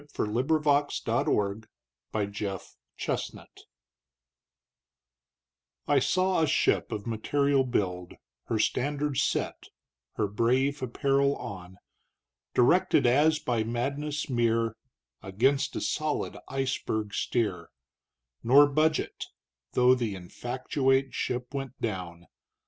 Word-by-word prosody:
Herman 105 - -1
Melville 145 +3 +2 0.2
The - - +1
Berg 105 +2 -1 0.5
(A 105 -2 +1
Dream) 100 -1 -5 2.4
I 145 - +4
SAW 185 +6 +1
a 160 - +3
ship - - +1
of 105 - -4
material 140 +5 +1
build 90 -8 -2 0.3
(Her 115 - -1
standards 140 +5 0
set, - - -1 0.5
her 105 - 0
brave 130 +7 +1
apparel 140 +2 +1
on) 95 -2 -8 0.8
Directed 130 +4 +4
as 150 +6 +4
by 120 -6 -1
madness 140 +6 -2
mere 115 -3 +1 0.5
Against 135 +9 +1
a - - -2
solid 155 -1 -2
iceberg 130 -6 -2
steer, 95 -8 -1 0.7
Nor 135 +5 +7
budge 155 +2 +2
it, - - -5 0.5
though 125 0 +5
the 120 -5 -1
infactuate 130 +7 -1
ship 125 +1 -3
went 135 -2 -5
down. 90 -5 -4
125 Hz, 105 wpm, -28 LUFS, 110-140 Hz, 2.4 s, Nor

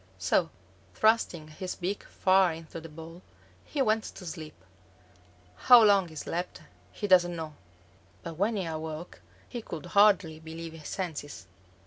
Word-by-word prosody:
So 100 - +1 0.5
thrusting 215 -8 +2
his 180 +4 -6
beak 190 +3 -3
far 185 -2 +3
into 165 0 -9
the 165 - -10
ball, 165 +3 -11 0.4
he 285 -3 -1
went 220 -2 +2
to 185 - -9
sleep. 160 -2 -7 1.0
How 245 -3 +7
long 200 -3 +5
he 160 - -13
slept 175 +3 -4 0.3
he 210 - -5
doesn't 180 -3 +4
know, 160 -2 -6 0.7
but 165 - -6
when 200 +7 0
he 190 -3 -2
awoke 160 - -6 0.3
he 240 - -6
could 170 -6 -7
hardly 190 -4 +4
believe 165 +1 -8
his 160 -2 -10
senses. 150 - -5
170 Hz, 145 wpm, -29 LUFS, 160-195 Hz, 1.0 s, How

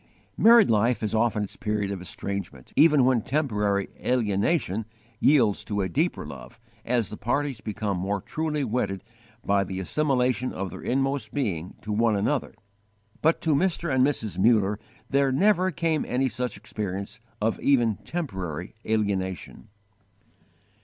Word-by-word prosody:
Married 230 - +6
life 115 +3 +2
has 110 0 -2
often 110 -1 +1
its 100 - -7
period 105 -2 -2
of 95 -2 -5
estrangement, 95 -7 -6
even 150 -4 +6
when 130 -3 +3
temporary 105 -8 0 0.2
alienation 110 - +1 0.3
yields 130 -9 +3
to 105 -1 -2
a 95 - 0
deeper 85 - 0
love, - - -10 0.2
as 120 -2 0
the 105 - -7
parties 135 -1 -1
become 105 -2 -3
more 100 +2 -1
truly 155 - -2
wedded 110 -5 -2 0.4
by 100 0 +3
the 95 0 -5
assimilation 130 +2 0
of 95 -1 -4
their - - -8
inmost 135 -3 -1
being 95 - -2
to 105 - -4
one 110 0 +2
another. 115 +5 -1 0.7
But 160 +2 +2
to 160 - +2
Mr. 170 -1 +1
and 130 -1 +4
Mrs. 120 -9 -1
Muller 105 -1 +3 0.3
there 140 -1 +2
never 185 +5 +3
came 165 -2 0
any 130 +2 +1
such 125 -4 -3
experience 100 0 -5 0.2
of 110 +1 0
even 120 -6 +2
temporary 95 - -5
alienation. 95 -10 -2
110 Hz, 145 wpm, -26 LUFS, 100-140 Hz, 0.7 s, Married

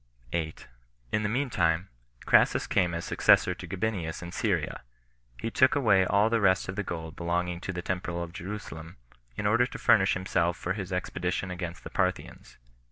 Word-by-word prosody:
8. 80 -2 -3 0.4
In 105 - +1
the 105 - -1
mean 130 +3 -1
time, 85 0 +1 0.4
Crassus - - +4
came 90 -2 +1
as 85 +1 -4
successor - - +4
to - - -9
Gabinius 95 -5 -3
in 85 - -7
Syria. - - -1 0.6
He 115 - -3
took 130 +4 +4
away 100 -9 +4
all 100 +3 +4
the 115 0 +1
rest 95 -1 +3
of 95 - -4
the 105 - -1
gold 80 -4 -6
belonging 85 0 -1
to 95 - -4
the 90 -1 -5
temple 85 -2 -3
of 85 0 -8
Jerusalem, 85 -3 -7 0.4
in 105 - -4
order 115 +4 +3
to - - -8
furnish 105 -5 +4
himself 85 -2 0
for 95 - -2
his 95 -2 -5
expedition 90 0 -2
against 90 -1 -6
the - - -8
Parthians. - - -2
90 Hz, 180 wpm, -28 LUFS, 85-105 Hz, 0.6 s, Crassus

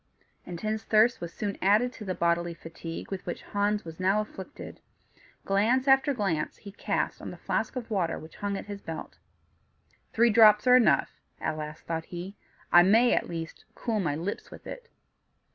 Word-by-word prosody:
Intense 215 +5 -3
thirst 220 +3 +3
was 170 -1 -5
soon 205 +2 -4
added 215 +6 +3
to 215 - -9
the 185 -1 -2
bodily 170 0 0
fatigue 165 +1 -8
with 190 -1 -4
which 175 - -5
Hans 205 0 -1
was 165 0 -9
now 190 +3 +2
afflicted; 200 -3 -8 0.7
glance 225 +7 +2
after 270 +1 +5
glance 195 - -1
he 200 - -11
cast 205 - -2
on - - -6
the - - -9
flask - - -2
of 240 -2 -6
water 180 -6 0
which 160 +1 -12
hung 200 -1 -2
at - - -7
his 200 -1 -7
belt. 165 -1 -8 0.9
"Three 235 +1 +4
drops 215 -1 +7
are 250 0 +7
enough," 250 - +3 0.2
at - - -2
last 155 0 -7
thought 165 -1 -3
he; 180 +3 -7 0.4
"I 175 - +9
may, 225 +7 +5
at - - 0
least, 165 -1 -6
cool 225 -3 -2
my 155 -7 0
lips 175 +6 -4
with - - -13
it." - - -9
200 Hz, 180 wpm, -28 LUFS, 170-220 Hz, 0.9 s, I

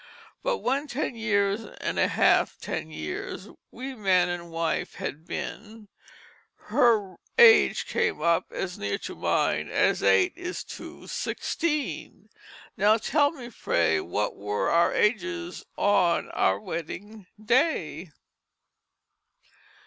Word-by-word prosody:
But - - 0
when 275 +4 0
Ten 275 0 -2
years 205 -2 +1 0.2
and - - -2
half - - +3
ten 80 - -4
Years 80 -1 -6 0.2
We 265 +3 -7
man 185 -6 +2
and 175 -1 -5
wife 165 0 -2
had 155 +3 -6
been 220 -1 -7 0.7
Her 210 -7 +1 0.2
age 470 -2 +7
came 470 -1 0
up 170 -1 +2
as 180 -1 -4
near 100 0 -1
to - - -7
mine - - 0
As - - +2
eight 95 0 +4
is 355 +1 -5 0.2
to - - -11
sixteen. 305 -4 -3 0.5
Now 210 +3 +4
tell 285 +5 +2
me 275 -6 -10
I - - -8
pray 85 - +1
What 105 +6 -2
were 105 +1 -2
our 170 +1 +4
Ages 345 +10 -1
on 180 -4 +2
our 95 +1 +2
Wedding 185 - -7
Day?" 210 - 0
205 Hz, 120 wpm, -26 LUFS, 165-265 Hz, 0.7 s, age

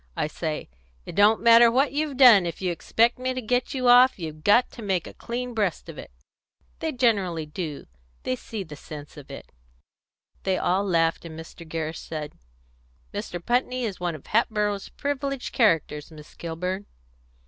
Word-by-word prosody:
I - - +1
say, 155 0 -4 0.4
'It - - -8
don't 205 +2 +4
matter 235 0 +8
what 265 +4 +2
you've 290 -1 -2
done; 230 -9 +8
if 170 - -5
you 185 -2 -1
expect 230 +8 +1
me 255 0 -2
to - - -2
get 250 +3 -1
you 255 -1 0
off, 250 +2 +7
you've 155 -3 -7
got 225 +7 +4
to 235 - -10
make 190 -5 -1
a - - -9
clean 245 +1 -5
breast 205 -7 -1
of - - -8
it.' - - -9 0.7
They 320 - -2
generally 200 - +1
do; 150 -1 -6 0.4
they 130 - -1
see 210 - -6
the 155 -4 -10
sense 150 0 -10
of 145 -3 -12
it." - - -10 0.9
They 190 -1 0
all 185 +3 +1
laughed, 165 -4 +1
and 160 -1 -9
Mr. 165 0 -11
Gerrish 160 0 -4
said, 155 -2 -6 0.8
"Mr. 175 - -5
Putney 250 +1 0
is 205 -5 -3
one 175 -2 -2
of 155 - -12
Hatboro's 210 -3 0
privileged 280 -2 -3
characters, 160 - +1
Miss 150 -2 -14
Kilburn." 180 +4 -4
200 Hz, 175 wpm, -25 LUFS, 165-245 Hz, 0.9 s, matter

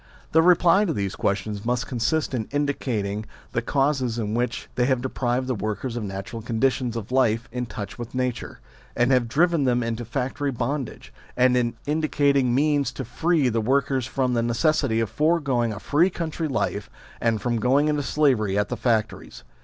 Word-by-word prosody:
The 160 - +5
reply 180 +3 +5
to 165 - 0
these 100 -5 -2
questions 100 +1 -2
must 125 +1 0
consist 130 +6 -1
in 115 -4 -2
indicating 115 -8 -2 0.2
the 115 - 0
causes 135 -2 0
which 115 +3 -2
have 125 +1 +2
deprived 125 0 -1
the 130 - -1
workers 110 +3 -3
of 120 - -3
natural 100 +3 -6
conditions 120 +1 0
of 115 0 -5
life 115 -3 +2
in 125 -1 -3
touch 105 +1 -7
with 120 +1 -7
nature, 125 - -3 0.3
and 120 +2 +2
have 125 -2 +3
driven 160 +4 +2
them 125 -1 +2
into 115 +1 -3
factory 135 +4 -2
bondage; 120 - -4 0.2
and 125 0 +4
in 120 -1 +1
indicating 140 -4 +2
means 145 0 +2
to 130 - -5
free 155 +4 +1
the 115 -2 +1
workers 130 +1 +1
from 130 -1 0
the 120 - +2
necessity 120 0 +1
of 115 - -1
foregoing 145 -7 +1
a 105 - -6
free 160 - +2
country 165 -2 -3
life, 110 -6 -2 0.3
and 115 -2 +1
from 120 0 -1
going 135 +6 +3
into 150 -1 +1
slavery 125 -10 +1
at 105 0 0
the - - -3
factories. 110 - -1
125 Hz, 175 wpm, -24 LUFS, 115-140 Hz, 0.3 s, The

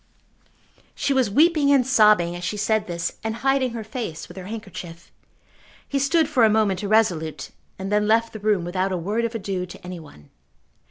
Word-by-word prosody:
She 280 - 0
was 260 -5 +2
weeping 300 - +3
and 270 -3 +4
sobbing 210 -9 +4
as 175 - -7
she 210 - -3
said 215 +1 0
this, 170 -1 -4
and 220 0 -2
hiding 270 -2 +2
her 230 -2 -5
face 220 -7 -6
with 175 - -13
her 190 -1 -8
handkerchief. 190 -6 -9 0.8
He 280 - -1
stood 310 +3 +2
for 265 -6 +2
a 220 - +6
moment 210 -4 +1
irresolute, 175 -9 0 0.3
and 190 +1 -5
then 210 0 +2
left 230 +1 +2
the 220 - -7
room 205 -4 +1
without 185 +2 -1
a 185 - -1
word 210 +7 -1
of 230 0 -4
adieu 190 -4 -3
to 180 - -12
any 180 -1 -7
one. 75 - -16
210 Hz, 195 wpm, -23 LUFS, 180-230 Hz, 0.8 s, a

